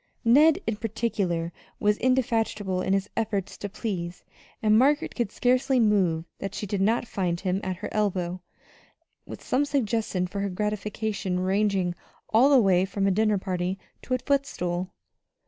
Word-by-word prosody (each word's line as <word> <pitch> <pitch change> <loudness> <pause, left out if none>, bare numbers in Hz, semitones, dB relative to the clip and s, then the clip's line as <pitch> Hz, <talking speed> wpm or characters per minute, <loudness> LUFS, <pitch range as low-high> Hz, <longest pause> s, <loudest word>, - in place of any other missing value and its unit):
Ned, 295 +7 +6
in 225 -2 -1
particular, 200 -7 -2 0.3
was 210 0 +2
indefatigable 225 -7 0
in 190 - -1
his 195 0 0
efforts 205 -4 -2
to 205 - -4
please; 185 -5 -4 0.4
and 215 -1 +3
Margaret 285 +6 +3
could 235 -5 -2
scarcely 255 +1 +2
move 190 -7 +2
that 195 0 -5
she - - -3
did 200 -1 -2
not 230 +4 +2
find 175 -5 -1
him 190 +1 -1
at 185 -1 -2
her 205 +4 -6
elbow 185 -4 -1 0.9
with - - -9
some 270 - +1
suggestion 225 -9 0
for 190 +2 -5
her 200 0 -1
gratification 210 -1 -2
ranging 190 -1 +1 0.4
all 245 +6 +6
the 280 - +6
way 190 -4 +4
from 195 +1 -1
a 195 - +3
dinner 215 +1 +2
party 185 -1 -2 0.2
to 255 - -1
a - - +1
footstool. 185 -10 -1
205 Hz, 160 wpm, -26 LUFS, 185-225 Hz, 0.9 s, Ned